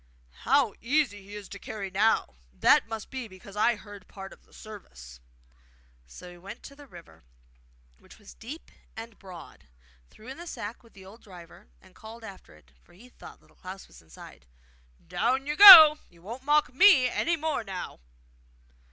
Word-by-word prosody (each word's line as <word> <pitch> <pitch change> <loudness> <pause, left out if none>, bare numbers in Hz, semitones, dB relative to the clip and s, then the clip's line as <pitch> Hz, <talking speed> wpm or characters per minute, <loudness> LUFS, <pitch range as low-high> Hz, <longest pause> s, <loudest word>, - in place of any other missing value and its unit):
'How 250 - -1
easy 255 -5 -2
he 200 +2 -13
is 205 -2 -10
to 200 - -11
carry 195 -2 -8
now! 200 - 0 0.3
That - - +3
must 225 -1 -9
be 260 -3 -7
because 195 0 -16
I 230 +3 +1
heard 205 -3 -15
part 195 -1 -12
of - - -22
the - - -29
service.' 60 - -14 0.9
So 180 - -14
he 175 - -16
went 195 +5 -12
to 280 - -13
the 290 0 -17
river, 175 - -17 0.8
which - - -20
was 210 -2 -16
deep 275 +9 -12 0.3
and 225 -1 -11
broad, 185 -3 -14 0.4
threw 220 - -19
in 265 - -10
the 345 +1 -11
sack 215 -7 -9
with 230 -2 -24
the 190 -1 -16
old 210 +5 -16
driver, 175 - -16
and - - -23
called 225 +1 -14
after 195 - -14
it, 75 -4 -25
for - - -26
he 230 +8 -19
thought - - -16
Little - - -28
Klaus 190 +1 -12
was - - -19
inside: 80 -5 -17 0.6
'Down 260 +3 -2
you 295 +1 -4
go! 320 -6 +10
You 170 -1 -24
won't 230 +7 -10
mock 295 -3 +1
me 280 -4 +5
any 340 +6 -2
more 315 -5 -4
now! 190 -4 -9
215 Hz, 180 wpm, -26 LUFS, 190-260 Hz, 0.9 s, go